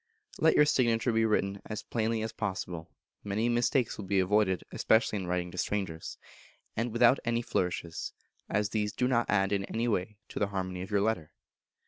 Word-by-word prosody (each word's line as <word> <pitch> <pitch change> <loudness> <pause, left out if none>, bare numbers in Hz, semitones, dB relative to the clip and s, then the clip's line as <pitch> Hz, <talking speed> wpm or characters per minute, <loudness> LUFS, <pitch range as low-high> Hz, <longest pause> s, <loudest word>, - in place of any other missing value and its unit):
Let 160 - +4
your 150 - +7
signature 120 -4 +2
be 115 0 +3
written 100 -2 0
as 105 -2 -5
plainly 115 -1 -1
as 110 - -3
possible 90 -4 -4 0.3
(many 105 +3 0
mistakes 120 0 +1
will 105 - -5
be 100 +1 0
avoided, 95 0 +2
especially 110 -1 +2
in 95 - -5
writing 90 0 -1
to 90 - -6
strangers), 95 -6 -3 0.6
and 115 +1 -1
without 120 +3 +5
any 115 0 0
flourishes, 85 -5 -2 0.4
as 105 0 +1
these 105 -2 -1
do 125 - +1
not 120 -2 +1
add 95 -1 +2
in 100 -1 +1
any 115 +3 -1
way 105 -1 -1
to - - -5
the 105 - +2
harmony 95 -2 -3
of 95 - -6
your 100 -2 +2
letter. 100 -8 -1
105 Hz, 185 wpm, -30 LUFS, 95-115 Hz, 0.6 s, your